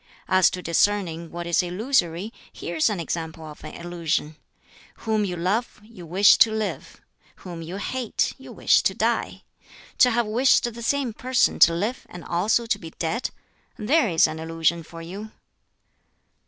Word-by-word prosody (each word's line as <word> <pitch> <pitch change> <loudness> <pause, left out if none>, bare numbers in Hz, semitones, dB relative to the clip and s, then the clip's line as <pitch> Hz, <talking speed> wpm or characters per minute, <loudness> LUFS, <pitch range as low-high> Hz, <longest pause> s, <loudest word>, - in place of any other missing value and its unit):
As 185 -1 +5
to 180 - -6
discerning 170 -1 0
what 175 +1 -6
is 170 +1 +2
illusory, 180 0 -1 0.2
here 170 - -6
is 155 - +3
an 205 -4 -3
example 160 -1 -5
of 150 -1 -11
an - - -8
illusion: 170 -3 -2 0.7
Whom 215 -2 +1
you 180 -2 -3
love 200 +9 -1
you 210 -6 -13
wish 190 +5 +6
to 225 - +6
live; 220 -1 -4 0.5
whom 175 -2 -7
you 165 +3 -7
hate 245 +3 -2
you - - -11
wish - - +3
to - - 0
die. - - -1 0.6
To 250 - +7
have 235 0 +1
wished 240 +5 +3
the 235 - -9
same 265 -1 0
person 255 +3 +1
to 165 - +7
live 210 +9 -3
and 175 - -10
also 205 +7 +1
to 220 -3 -1
be 165 - -9
dead 205 +9 -2 0.5
there 255 +4 +2
is 165 -2 +4
an 155 0 -3
illusion 165 +1 0
for 165 +1 -11
you." 200 +6 -8
185 Hz, 170 wpm, -24 LUFS, 170-220 Hz, 0.7 s, To